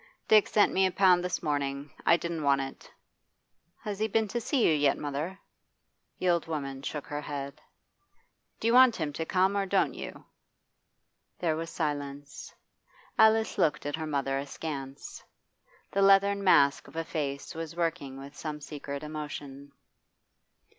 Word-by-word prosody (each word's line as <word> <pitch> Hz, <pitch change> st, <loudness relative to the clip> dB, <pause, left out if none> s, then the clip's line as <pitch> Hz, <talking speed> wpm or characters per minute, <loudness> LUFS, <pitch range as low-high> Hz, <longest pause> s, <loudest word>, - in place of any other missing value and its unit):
'Dick 215 Hz, -1 st, +6 dB
sent 210 Hz, -, +3 dB
me 190 Hz, 0 st, +4 dB
a -, -, -3 dB
pound 180 Hz, -2 st, +4 dB
this 180 Hz, -1 st, -2 dB
morning. 140 Hz, -1 st, -2 dB, 0.2 s
I 170 Hz, -, +7 dB
didn't 170 Hz, -2 st, -4 dB
want 140 Hz, -1 st, +3 dB
it' 135 Hz, 0 st, -7 dB, 0.9 s
'Has 205 Hz, -2 st, -4 dB
he 220 Hz, -, +1 dB
been 220 Hz, 0 st, +1 dB
to 240 Hz, +2 st, -2 dB
see 250 Hz, +1 st, +1 dB
you 160 Hz, -, +4 dB
yet, 145 Hz, -2 st, +2 dB
mother?' 150 Hz, +6 st, -4 dB, 0.8 s
The 185 Hz, -, -2 dB
old 170 Hz, -2 st, +2 dB
woman 140 Hz, -4 st, -4 dB
shook 145 Hz, +1 st, -5 dB
her 145 Hz, 0 st, -4 dB
head. 140 Hz, -2 st, -6 dB, 1.0 s
'Do -, -, -6 dB
you 230 Hz, -, +3 dB
want 255 Hz, -2 st, +7 dB
him 150 Hz, -3 st, -3 dB
to 160 Hz, +2 st, -4 dB
come, 190 Hz, +2 st, +2 dB
or 200 Hz, -1 st, 0 dB
don't 195 Hz, 0 st, +2 dB
you?' -, -, -8 dB, 1.1 s
There 165 Hz, -3 st, 0 dB
was 165 Hz, +1 st, -4 dB
silence. 145 Hz, -3 st, -4 dB, 0.7 s
Alice 220 Hz, 0 st, +4 dB
looked 150 Hz, -2 st, +1 dB
at 145 Hz, -, -1 dB
her 160 Hz, -1 st, -4 dB
mother 135 Hz, -2 st, -1 dB
askance. 140 Hz, -1 st, -6 dB, 0.7 s
The 200 Hz, -, +1 dB
leathern 200 Hz, 0 st, +5 dB
mask 140 Hz, -7 st, +4 dB
of -, -, -15 dB
a 165 Hz, -, -1 dB
face 140 Hz, -4 st, -4 dB
was 165 Hz, 0 st, -6 dB
working 165 Hz, -6 st, -2 dB
with 140 Hz, +2 st, -10 dB
some 150 Hz, -2 st, -5 dB
secret 140 Hz, -1 st, -7 dB
emotion. 145 Hz, -2 st, -7 dB
155 Hz, 160 wpm, -29 LUFS, 140-185 Hz, 1.1 s, I